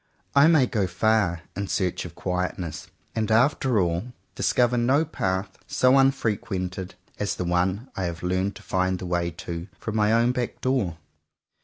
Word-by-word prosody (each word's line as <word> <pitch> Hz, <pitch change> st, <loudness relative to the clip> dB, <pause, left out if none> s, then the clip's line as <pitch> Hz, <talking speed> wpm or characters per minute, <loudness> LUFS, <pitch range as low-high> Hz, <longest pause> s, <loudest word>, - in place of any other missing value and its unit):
I 140 Hz, +2 st, +7 dB
may 160 Hz, -6 st, +5 dB
go 105 Hz, -6 st, 0 dB
far 100 Hz, -5 st, +1 dB
in 100 Hz, 0 st, -3 dB
search 95 Hz, -3 st, -1 dB
of -, -, -9 dB
quietness, 90 Hz, -3 st, -3 dB, 0.3 s
and 110 Hz, -1 st, -1 dB
after 125 Hz, +1 st, +3 dB
all, 90 Hz, +6 st, -1 dB, 0.2 s
discover 125 Hz, 0 st, +2 dB
no 130 Hz, +6 st, +3 dB
path 95 Hz, -9 st, -2 dB
so 130 Hz, +1 st, +4 dB
unfrequented 100 Hz, -8 st, 0 dB, 0.2 s
as 100 Hz, -5 st, -1 dB
the 90 Hz, -, -3 dB
one 95 Hz, +7 st, 0 dB
I 95 Hz, -, -2 dB
have 85 Hz, 0 st, -5 dB
learned 95 Hz, +2 st, 0 dB
to -, -, -12 dB
find 95 Hz, 0 st, 0 dB
the 90 Hz, -, -7 dB
way 85 Hz, -1 st, 0 dB
to, 85 Hz, +1 st, -6 dB
from 110 Hz, -, -5 dB
my 105 Hz, 0 st, +3 dB
own 115 Hz, +2 st, +4 dB
back 125 Hz, -1 st, -3 dB
door. 125 Hz, -11 st, 0 dB
100 Hz, 165 wpm, -25 LUFS, 90-120 Hz, 0.3 s, I